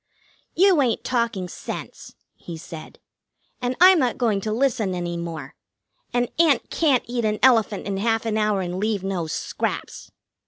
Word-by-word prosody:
"You 370 -4 +5
ain't 240 -4 0
talking 235 -7 -1
sense," - - -8 0.2
he 170 -2 -9
said. 160 0 -10 0.6
"And 250 +1 -1
I'm 365 0 +8
not 250 -4 0
going 220 -5 +1
to 215 - -3
listen 230 -5 0
any 175 -1 -3
more. 165 -5 -6 0.6
An 245 0 +1
ant 320 -5 +3
can't 285 -7 +2
eat 240 0 -3
an 215 -1 0
elephant 225 -5 +3
in 200 -1 -2
half 225 +2 0
an 220 -1 -1
hour 210 -2 +1
and 180 0 -4
leave 210 -2 -1
no 190 -4 -2
scraps." 155 - -4
220 Hz, 160 wpm, -23 LUFS, 190-250 Hz, 0.6 s, I'm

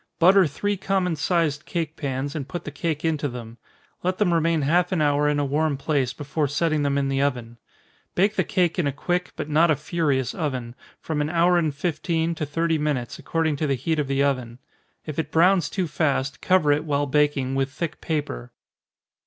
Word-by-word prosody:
Butter 185 +1 +6
three 205 +8 -2
common 190 -2 0
sized 160 0 0
cake 165 -3 -3
pans, 140 -1 -3
and 140 -4 -4
put 175 +4 -6
the 145 - -5
cake 155 +1 -3
into 155 -2 0
them 120 -1 -9 0.4
let 185 +1 -1
them 190 -5 +2
remain 165 -2 +2
half 175 +5 +2
an 185 - +1
hour 145 0 +2
in 150 - +1
a 145 - +1
warm 145 +1 0
place, 140 -3 0
before 145 +2 -2
setting 155 +2 0
them 140 -1 +1
in 140 -1 +1
the 135 0 0
oven. 120 -4 -2 0.6
Bake 200 +4 +2
the - - +2
cake 180 -3 0
in 160 - +2
a - - +1
quick, 180 +6 -2
but - - -4
not 155 +3 +4
a 155 - +4
furious 145 -5 -1
oven, 130 -7 -3 0.3
from 155 -2 -2
an 150 - -1
hour 175 +1 +3
and 155 -4 -1
fifteen 165 +1 -1
to 155 -2 -4
thirty 165 +2 0
minutes, 145 -5 -2
according 160 -3 -1
to 155 - -1
the 135 - +1
heat 155 +5 -1
of 145 - 0
the 135 0 +1
oven. 125 -4 -1 0.5
If 155 0 -5
it 160 - -2
browns 175 +1 +4
too 185 -3 -1
fast, 140 -3 -1
cover 180 -6 +3
it, 145 +1 +2
while 145 -2 0
baking, 145 -2 +1
with 135 0 0
thick 155 +3 -5
paper. - - -3
150 Hz, 205 wpm, -24 LUFS, 140-170 Hz, 0.6 s, Butter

